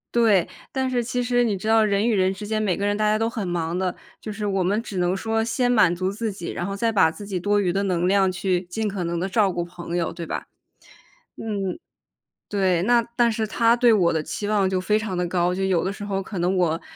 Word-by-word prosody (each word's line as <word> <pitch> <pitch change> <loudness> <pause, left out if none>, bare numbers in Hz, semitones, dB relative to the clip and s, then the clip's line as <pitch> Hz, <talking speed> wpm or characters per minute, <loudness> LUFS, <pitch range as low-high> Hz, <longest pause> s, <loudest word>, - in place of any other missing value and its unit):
对， 210 -7 +4 0.2
但 265 -1 -1
是 245 -2 0
其 245 +1 -2
实 245 0 +2
你 210 -4 0
知 215 - -6
道 220 0 +5
人 205 +2 +1
与 230 - +2
人 190 0 +2
之 205 +1 -8
间 215 0 -1
每 185 -4 0
个 200 - -1
人 205 0 +1
大 215 - -1
家 215 +1 +2
都 225 +1 +1
很 220 -5 -4
忙 170 0 -2
的， 185 -1 -1 0.3
就 215 - -6
是 210 0 -4
我 195 -2 0
们 205 +5 +1
只 205 - -8
能 180 +1 +1
说 225 +2 -1
先 245 +2 0
满 210 -8 +4
足 185 +2 -1
自 215 +2 -3
己， 175 -3 -6
然 175 - -3
后 195 - -3
再 225 +3 0
把 195 -7 +4
自 205 +3 -10
己 190 -3 -2
多 205 +3 +1
余 180 -3 0
的 200 +1 0
能 180 -2 0
量 190 -1 +3
去 180 0 0
尽 220 +3 -2
可 195 -3 -3
能 170 0 -2
地 190 - -1
照 200 -1 +2
顾 175 - -2
朋 175 0 -6
友 165 -1 -1
对 170 -1 -6
吧。 - - -4 0.9
嗯， 200 - -3 0.7
对， 185 -4 +1
那， 235 +3 +3
但 240 -2 +3
是 220 0 -1
她 230 +2 +3
对 240 -2 +4
我 180 -5 +3
的 160 -1 -1
期 205 - -4
望 205 -3 +2
就 185 -1 0
非 210 +3 +2
常 215 -4 -3
的 175 0 -1
高， 175 0 +1
就 190 +1 -2
有 185 -3 +1
的 190 +2 -2
时 205 - -8
候 195 -1 -2
可 190 -2 -6
能 185 +2 +1
我， 165 -2 +1
200 Hz, 285 characters per minute, -23 LUFS, 180-220 Hz, 0.9 s, 道